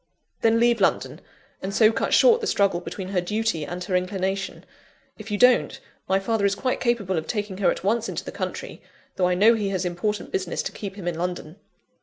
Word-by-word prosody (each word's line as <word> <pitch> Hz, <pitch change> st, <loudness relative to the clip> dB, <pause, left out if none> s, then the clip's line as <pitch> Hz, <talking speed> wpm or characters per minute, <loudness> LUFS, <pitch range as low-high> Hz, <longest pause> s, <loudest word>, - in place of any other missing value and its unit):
"Then 225 Hz, 0 st, +3 dB
leave 235 Hz, -2 st, +3 dB
London; 190 Hz, -, 0 dB, 0.4 s
and 195 Hz, +1 st, -4 dB
so 220 Hz, -1 st, +6 dB
cut 225 Hz, -, -2 dB
short 470 Hz, -1 st, +5 dB
the 435 Hz, -, -2 dB
struggle 195 Hz, -3 st, +2 dB
between 185 Hz, +1 st, -7 dB
her 190 Hz, -2 st, 0 dB
duty 210 Hz, -3 st, -1 dB
and 175 Hz, +4 st, -5 dB
her 185 Hz, 0 st, -2 dB
inclination. 190 Hz, +1 st, -2 dB, 0.5 s
If 215 Hz, +1 st, -9 dB
you 205 Hz, -, -1 dB
don't, 250 Hz, +2 st, +4 dB, 0.3 s
my 190 Hz, +1 st, +3 dB
father 215 Hz, +1 st, -1 dB
is 200 Hz, 0 st, +2 dB
quite 255 Hz, +4 st, -1 dB
capable 205 Hz, -8 st, 0 dB
of 160 Hz, -, -9 dB
taking 205 Hz, -4 st, -3 dB
her 185 Hz, -3 st, +3 dB
at -, -, -2 dB
once 225 Hz, +3 st, 0 dB
into -, -, -4 dB
the -, -, -6 dB
country, -, -, -6 dB, 0.4 s
though 180 Hz, -, +3 dB
I 180 Hz, -, +1 dB
know 215 Hz, +5 st, +6 dB
he 210 Hz, -3 st, -1 dB
has 190 Hz, -2 st, -2 dB
important 180 Hz, +4 st, -2 dB
business 185 Hz, -2 st, -2 dB
to -, -, -4 dB
keep 195 Hz, -2 st, -7 dB
him 190 Hz, -4 st, -7 dB
in 170 Hz, -2 st, -2 dB
London. 175 Hz, -1 st, -4 dB
195 Hz, 215 wpm, -24 LUFS, 180-220 Hz, 0.5 s, so